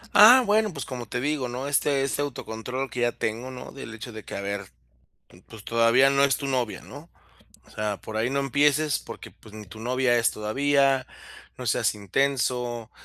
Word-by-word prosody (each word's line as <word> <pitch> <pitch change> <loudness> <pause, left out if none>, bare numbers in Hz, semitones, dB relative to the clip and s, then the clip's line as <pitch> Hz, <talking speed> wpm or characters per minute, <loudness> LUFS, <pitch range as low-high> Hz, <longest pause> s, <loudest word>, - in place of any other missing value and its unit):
Ah, 255 +1 +9
bueno, 215 0 +2
pues, 140 -6 -6
como 125 -4 -7
te 125 - -3
digo, 140 -2 -1
¿no? 130 +3 -4
Este 140 -1 +1
este 140 +1 -1
autocontrol 125 -1 -4
que 125 - -5
ya 120 0 +2
tengo, 115 +4 -3
¿no?, 125 -1 -9
del 115 -5 -9
hecho 115 +2 -8
de 110 -1 -9
que: - - -8
"A 100 - -4
ver, 100 0 -4 0.6
mm, 90 - -18
pues, 110 -2 -12
todavía 115 +4 +4
no 140 0 +4
es 140 - +2
tu 140 -2 -5
novia", 125 -5 -1
¿no? - - -12 0.6
O - - -21
sea: 105 -1 -3
"Por 110 - -6
ahí 115 +3 0
no 140 +1 0
empieces 145 +2 +2
porque, - - -10
pues, 110 - -18
ni 110 -1 -9
tu 105 +3 -12
novia 125 +1 +1
es 115 -2 +3
todavía, 135 +5 +1 0.5
no - - -7
seas - - +1
intenso, 120 +1 -1
125 Hz, 200 wpm, -25 LUFS, 110-140 Hz, 0.6 s, Ah